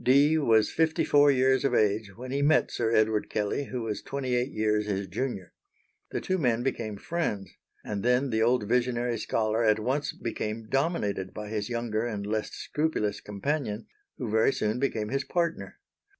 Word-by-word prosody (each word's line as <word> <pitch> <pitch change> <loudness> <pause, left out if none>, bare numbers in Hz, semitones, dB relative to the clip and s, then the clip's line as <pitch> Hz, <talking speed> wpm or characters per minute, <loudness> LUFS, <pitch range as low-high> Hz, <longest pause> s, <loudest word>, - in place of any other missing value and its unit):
Dee 140 +5 +5
was 115 -8 +3
fifty 160 0 +1
four 145 0 +5
years 130 -1 +3
of 135 -3 +2
age 105 -2 +1
when 125 +1 -7
he 140 +1 0
met 150 +2 +3
Sir 115 -1 0
Edward 110 -1 +2
Kelley 105 +7 -1
who 125 -2 -4
was 110 -2 -3
twenty 135 -2 -3
eight 125 +2 +1
years 105 -1 0
his 100 -1 -1
junior. 95 -2 -4 0.6
The - - -2
two 185 0 -1
men 120 -5 +1
became 110 -5 -2
friends, 105 - -3 0.3
and 100 -1 -3
then 125 +3 +2
the 110 0 +1
old 120 -2 +2
visionary 120 -1 +1
scholar 110 +1 0
at 110 -1 +4
once 130 +7 -1
became 110 -1 -4
dominated 110 - -1
by 105 -1 -6
his 105 0 -3
younger 115 -2 -1
and 105 -4 -3
less 110 +1 -1
scrupulous 150 -9 -2
companion, 110 +1 -3 0.3
who 125 - -4
very 110 +4 +3
soon 105 +3 -1
became 110 -6 -1
his 135 +2 -1
partner. 170 +1 -2
115 Hz, 180 wpm, -28 LUFS, 105-135 Hz, 0.6 s, Dee